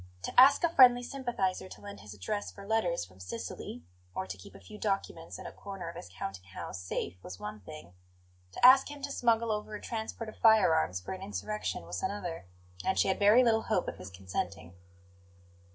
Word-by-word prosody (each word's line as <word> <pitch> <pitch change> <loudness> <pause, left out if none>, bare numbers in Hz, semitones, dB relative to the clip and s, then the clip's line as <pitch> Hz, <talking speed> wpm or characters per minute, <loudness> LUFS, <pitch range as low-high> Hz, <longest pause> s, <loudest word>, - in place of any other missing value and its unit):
To - - -4
ask 270 +6 +8
a 340 - +4
friendly 245 -5 +7
sympathizer 240 -9 -2
to - - -11
lend 200 0 -9
his 105 -1 -10
address 205 - -3
for 200 - -11
letters 200 - 0
from 90 +1 -19
Sicily 90 -2 -6 0.3
or 95 - -2
to 95 0 -6
keep 95 - -14
a - - -11
few 210 -1 -12
documents 195 -5 -2
in - - -10
a - - -6
corner 195 -4 -7
of 170 - -9
his 90 - -9
counting 95 0 -6
house 95 0 -7
safe 90 0 -4
was 90 0 -9
one 105 0 -6
thing; 85 -2 -11 0.6
to - - +3
ask 265 +2 +8
him 290 -1 -9
to 280 - -3
smuggle 230 -3 +2
over 210 0 -3
a - - -6
transport 225 0 -5
of 215 - -9
firearms 160 - +4
for 90 - -6
an 190 - -8
insurrection 210 - -4
was 85 +1 -4
another; 180 - -3 0.4
and 190 - 0
she - - +3
had 190 - 0
very 210 +5 +7
little 225 -2 +3
hope 215 -6 0
of - - -4
his 90 +1 -9
consenting. 90 -2 -5
195 Hz, 205 wpm, -31 LUFS, -, 0.6 s, ask